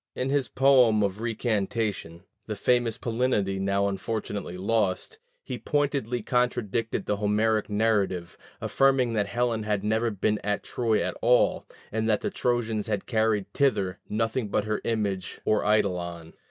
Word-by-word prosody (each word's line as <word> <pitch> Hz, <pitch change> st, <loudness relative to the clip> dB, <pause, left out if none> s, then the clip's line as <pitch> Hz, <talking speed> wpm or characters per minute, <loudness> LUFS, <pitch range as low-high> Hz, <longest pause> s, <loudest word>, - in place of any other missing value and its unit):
In 130 Hz, +1 st, -1 dB
his 140 Hz, -3 st, +1 dB
poem 125 Hz, -6 st, +4 dB
of 100 Hz, +1 st, -2 dB
recantation 110 Hz, -6 st, -2 dB, 0.2 s
(the -, -, -3 dB
famous 120 Hz, -2 st, +1 dB
Palinode 115 Hz, -6 st, 0 dB
now 100 Hz, +1 st, +1 dB
unfortunately 100 Hz, -2 st, -4 dB
lost) 105 Hz, -, -1 dB, 0.2 s
he -, -, -5 dB
pointedly 135 Hz, -6 st, -1 dB
contradicted 115 Hz, -3 st, 0 dB
the 105 Hz, -, 0 dB
Homeric 105 Hz, +1 st, +1 dB
narrative, 105 Hz, -5 st, 0 dB, 0.2 s
affirming 135 Hz, -3 st, +2 dB
that 105 Hz, -2 st, 0 dB
Helen 120 Hz, -1 st, 0 dB
had 105 Hz, -2 st, -1 dB
never 110 Hz, +2 st, +1 dB
been 105 Hz, 0 st, 0 dB
at 105 Hz, 0 st, -1 dB
Troy 115 Hz, -3 st, 0 dB
at -, -, -3 dB
all, 125 Hz, +1 st, +3 dB, 0.2 s
and 110 Hz, +1 st, -1 dB
that 105 Hz, -, +2 dB
the -, -, -2 dB
Trojans 115 Hz, -3 st, -1 dB
had 105 Hz, -3 st, -2 dB
carried 110 Hz, -4 st, 0 dB
thither 105 Hz, -9 st, +1 dB
nothing 115 Hz, +2 st, -1 dB
but 100 Hz, -, 0 dB
her 105 Hz, 0 st, -2 dB
image 100 Hz, -5 st, -2 dB
or 110 Hz, -, +2 dB
eidolon. 90 Hz, -6 st, 0 dB
110 Hz, 145 wpm, -27 LUFS, 100-120 Hz, 0.2 s, poem